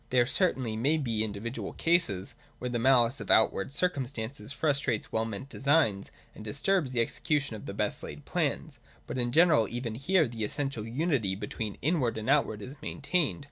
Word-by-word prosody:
There 125 -1 +4
certainly 130 - 0
may 140 +8 +2
be 115 -7 0
individual 110 +4 -5
cases, 160 - +1 0.2
where 125 0 -4
the 120 - -1
malice 125 +1 +4
of - - -7
outward 110 +1 +3
circumstances 140 -6 -2
frustrates 140 -6 0
well 110 0 0
meant 110 +3 -6
designs, 140 -8 +1 0.2
and - - -10
disturbs 140 - 0
the 120 -2 +1
execution 145 +1 -1
of 105 - -9
the - - -4
best - - -1
laid - - -8
plans. - - -2 0.3
But 130 - -4
in 120 -1 0
general 155 - +5
even 120 0 -4
here 155 +7 +2
the 115 -2 -4
essential 135 -1 -2
unity 125 - 0
be 105 +2 -5
tween 105 -1 -4
inward 135 -7 +1
and 110 +5 -1
outward 110 -8 +1
is 130 - -7
maintained. 160 +1 0
125 Hz, 180 wpm, -29 LUFS, 110-145 Hz, 0.3 s, general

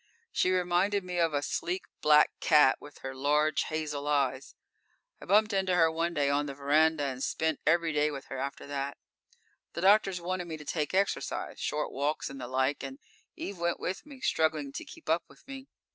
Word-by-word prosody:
She - - +2
reminded 185 +2 +1
me 180 -1 -3
of 165 -1 +3
a 145 -1 -1
sleek, 180 +5 -2 0.2
black 150 0 +6
cat, 150 -4 +5
with 145 - -12
her 135 0 -4
large, 150 +3 +1
hazel 150 -2 -3
eyes. 140 -2 0 0.7
I - - -9
bumped 210 +3 +3
into 190 -2 +1
her 165 -2 +4
one 170 +1 -1
day 145 -2 +2
on 145 +1 +1
the 140 - -6
verandah, 150 +2 +3
and 130 -2 -3
spent 160 -2 -1
every 165 0 +3
day 150 0 +2
with 140 -2 -7
her - - -6
after 140 +1 -4
that._ 140 0 -3 0.8
_The - - -4
doctors 195 -2 +4
wanted 180 0 -3
me 160 -2 -5
to 150 - -11
take 155 +2 -2
exercise 195 +1 -1
short 150 0 -2
walks 145 +2 -2
and 135 -1 -8
the 125 - -5
like, 130 +2 0
and 270 - -6 0.4
Eve 200 - -6
went 170 0 0
with 185 - -3
me, 280 -3 -13
struggling 155 - +1
to - - -6
keep - - -14
up 165 +2 +2
with - - -20
me. 270 0 -8
155 Hz, 200 wpm, -30 LUFS, 145-180 Hz, 0.8 s, black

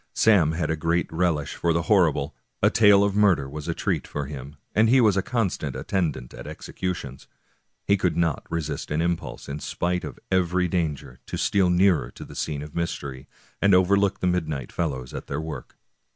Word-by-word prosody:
Sam 90 -8 +4
had 80 -2 -1
a - - +1
great 85 +2 +1
relish 80 -4 0
for 85 -1 0
the 85 0 0
horrible; 80 -7 +2 0.3
a - - +5
tale 105 -2 +6
of 100 -1 0
murder 100 -9 +3
was 75 +2 -7
a - - -1
treat - - -1
for 75 -1 -4
him, 70 0 -8 0.2
and 110 +1 +4
he 130 +2 +6
was 110 -5 +4
a 95 - +2
constant 95 - -2
attendant 75 -10 -2
at - - -9
executions. 80 -8 -5 0.6
He 100 - +3
could 90 -3 0
not 85 -3 0
resist 80 -4 -3
an 75 - 0
impulse, 85 0 -2
in 70 +2 -5
spite 90 +3 -2
of - - -7
every 90 -1 +2
danger, 80 -8 -2
to - - -4
steal 95 -3 +2
nearer 90 -7 +3
to - - -9
the - - -12
scene 75 -2 -3
of 75 - -10
mystery, 70 -6 -4 0.3
and 100 -1 +5
overlook 100 +2 +3
the - - 0
midnight 80 -8 -1
fellows 65 -7 -3
at - - -6
their 70 - -3
work. 80 0 -7
85 Hz, 195 wpm, -25 LUFS, 75-95 Hz, 0.6 s, tale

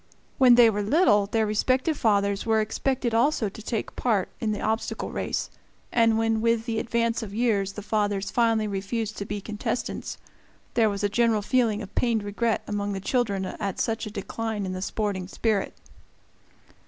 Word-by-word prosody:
When 250 -2 +7
they 240 -1 +8
were 210 -2 +1
little, 210 - +3
their 220 +1 +1
respective 255 +8 +1
fathers 200 -5 +1
were 220 -1 +2
expected 240 +3 -1
also 230 -2 +2
to 210 - -11
take 220 0 -4
part 215 -7 +1
in 220 - -1
the 210 - -2
obstacle 220 +1 -2
race, - - -3 0.4
and 230 -1 +3
when 225 -1 +1
with 230 0 +1
the 225 -2 -1
advance 230 0 0
of 205 -2 -7
years 210 -5 +1
the 210 - -7
fathers 205 -2 -1
finally 225 -2 +2
refused 210 +2 -3
to 200 - -3
be 205 0 -4
contestants, 215 +4 -4 0.6
there 225 -2 +3
was 200 0 -3
a - - +4
general 225 0 +2
feeling 225 -2 +1
of 200 - -11
pained 230 -3 +1
regret 215 +3 -1
among 205 -1 -2
the 195 - -3
children 200 -2 0
at 195 0 -4
such 225 0 -1
a - - -5
decline 210 +1 -4
in 185 - -3
the 185 - -5
sporting 195 -2 -2
spirit. 210 0 0
220 Hz, 180 wpm, -26 LUFS, 205-230 Hz, 0.6 s, they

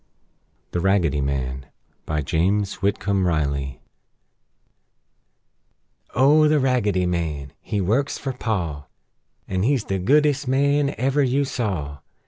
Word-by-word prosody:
THE 90 - -1
RAGGEDY 85 -6 +2
MAN 65 -1 -3 0.4
BY 75 -1 -1
JAMES 95 +7 0
WHITCOMB 100 -1 0
RILEY 70 -5 -1 2.3
O 145 +5 +5
the 150 0 +3
Raggedy 110 -9 +1
Man! 80 -6 -3
He 105 - -3
works 120 +10 0
fer 135 -2 -4
Pa; 85 - -3 0.6
An' 95 -1 -1
he's 130 +2 +2
the 95 -1 -2
goodest 145 +6 +2
man 140 +2 +2
ever 135 +4 +1
you 135 +1 +2
saw! 90 - -3
100 Hz, 110 wpm, -23 LUFS, -, 2.3 s, O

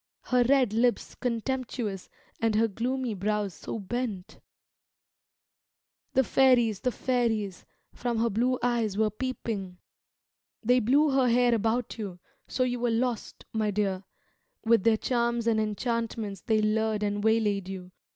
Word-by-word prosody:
Her 250 -1 +3
red 255 -3 +3
lips 240 +2 +1
contemptuous, 240 -4 -3 0.3
and 225 -1 +1
her 225 +1 +4
gloomy 245 +3 -2
brows 205 0 -1
so - - -6
bent? 215 -2 -4 1.7
The 265 - +4
fairies, 240 -5 +3
the 250 - 0
fairies, 225 -7 -1 0.3
from 240 -2 -2
her 230 +1 +1
blue 250 +5 +1
eyes 230 -5 0
were 215 0 +2
peeping; 215 -6 -4 0.9
They 250 +3 +4
blew 280 +6 +3
her 265 -2 +3
hair 245 0 +4
about 230 +2 0
you, 195 -5 -5 0.3
so 255 - 0
you 245 -1 -1
were 240 0 +1
lost, 235 0 -2
my 215 -1 0
dear; 195 -2 -1 0.6
With 225 -3 +4
their 225 -1 +5
charms 235 -1 0
and 225 -1 +2
enchantments 220 -2 -2
they 215 +2 +1
lured 215 0 +1
and 205 0 -1
waylaid 210 -4 +1
you. 185 -1 -7
225 Hz, 140 wpm, -28 LUFS, 210-245 Hz, 1.7 s, their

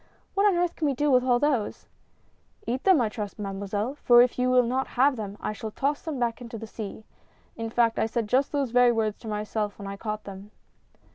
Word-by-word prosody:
" - - -39
What 400 +1 +3
on 395 - +3
earth 350 -1 0
can 310 - -1
we 275 - 0
do 290 +3 +1
with 250 -1 +5
all 250 -1 +3
those? 260 -6 -1 0.3
" - - -39
" 420 - -33
Eat 255 -3 -3
them 380 -6 +6
I 235 - +2
trust. 210 -2 -6
Mademoiselle 205 +3 -3
— - - -34
for 240 0 +8
if 250 0 -2
you 250 0 +2
Avill 250 -1 +4
not 260 +3 -1
have 270 +2 +4
them, 205 -3 -6
I - - -3
shall 220 +1 -6
toss 280 +6 -1
them 315 -4 -4
back 235 -2 -1
to 235 -2 -8
the 225 - -7
sea. 215 -1 -7 0.5
In 225 0 -4
fact, 230 0 +2
I - - +2
said 225 -1 -2
just 265 +5 +2
those 280 -4 -1
very 245 0 +5
words 220 -2 -1
to 225 - -10
myself 210 0 -3
when 200 - -8
I 200 0 -6
caught 215 0 -4
them." 195 +1 -10
235 Hz, 255 wpm, -26 LUFS, 215-260 Hz, 0.5 s, for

